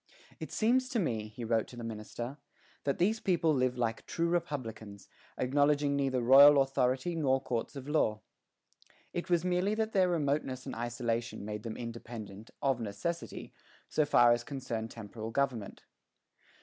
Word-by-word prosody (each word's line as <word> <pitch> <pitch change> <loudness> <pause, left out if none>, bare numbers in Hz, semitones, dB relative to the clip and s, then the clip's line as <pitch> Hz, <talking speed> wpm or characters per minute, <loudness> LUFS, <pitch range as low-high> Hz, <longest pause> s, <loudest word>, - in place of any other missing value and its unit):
"It - - -6
seems 255 +3 +2
to 235 - 0
me," 115 - -1
he 110 +2 -7
wrote 115 -1 +1
to - - -12
the 120 - -7
minister, 115 +4 -6 0.5
"that 140 - 0
these 215 +6 +2
people 170 -6 +2
live 130 -2 +1
like 115 -2 -1
true 170 0 0
republicans, 115 - -4 0.3
acknowledging 145 +2 +2
neither 135 -2 +1
royal 140 +3 +9
authority 135 +4 +1
nor 135 -4 +2
courts 125 0 -3
of 135 0 -7
law." 110 -8 +1 0.9
It 175 - -4
was 175 0 +2
merely 180 +3 +1
that 220 0 -1
their 185 -2 +4
remoteness 140 -5 -1
and - - -5
isolation 120 -2 -3
made 105 0 -4
them 110 0 -6
independent, 115 -3 -8
of 135 -3 +2
necessity, 115 +11 -4 0.4
so 155 - +2
far 120 -4 +5
as 120 0 +2
concerned 120 -5 -4
temporal 110 0 -7
government. 120 -4 -2
130 Hz, 155 wpm, -31 LUFS, 115-150 Hz, 0.9 s, royal